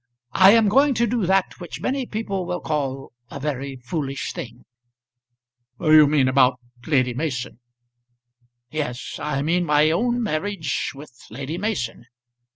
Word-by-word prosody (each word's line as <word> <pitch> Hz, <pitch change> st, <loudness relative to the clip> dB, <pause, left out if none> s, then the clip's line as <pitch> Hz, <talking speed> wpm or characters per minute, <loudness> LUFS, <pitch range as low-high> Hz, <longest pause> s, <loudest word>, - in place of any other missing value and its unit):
"I 190 Hz, +2 st, +7 dB
am 225 Hz, -2 st, +5 dB
going 275 Hz, +6 st, +4 dB
to 235 Hz, +1 st, +2 dB
do 225 Hz, -4 st, -1 dB
that 190 Hz, 0 st, +1 dB
which 175 Hz, -2 st, -7 dB
many 260 Hz, -1 st, -2 dB
people 200 Hz, -4 st, -3 dB
will 180 Hz, -, -2 dB
call 135 Hz, -3 st, -3 dB, 0.2 s
a 140 Hz, -, -7 dB
very 140 Hz, -1 st, -4 dB
foolish 135 Hz, +2 st, -4 dB
thing." 120 Hz, 0 st, -8 dB, 1.1 s
"You 155 Hz, -2 st, +6 dB
mean 140 Hz, -3 st, +3 dB
about 130 Hz, -1 st, +3 dB, 0.3 s
Lady 130 Hz, -5 st, +2 dB
Mason." 130 Hz, -4 st, -4 dB, 1.1 s
"Yes; 145 Hz, -5 st, -4 dB
I 145 Hz, -2 st, -2 dB
mean 175 Hz, +4 st, +1 dB
my 150 Hz, -1 st, +3 dB
own 240 Hz, +7 st, 0 dB
marriage 175 Hz, -, -2 dB
with 145 Hz, 0 st, -11 dB, 0.2 s
Lady 140 Hz, +5 st, -5 dB
Mason. 185 Hz, -, -3 dB
155 Hz, 140 wpm, -23 LUFS, 135-195 Hz, 1.1 s, I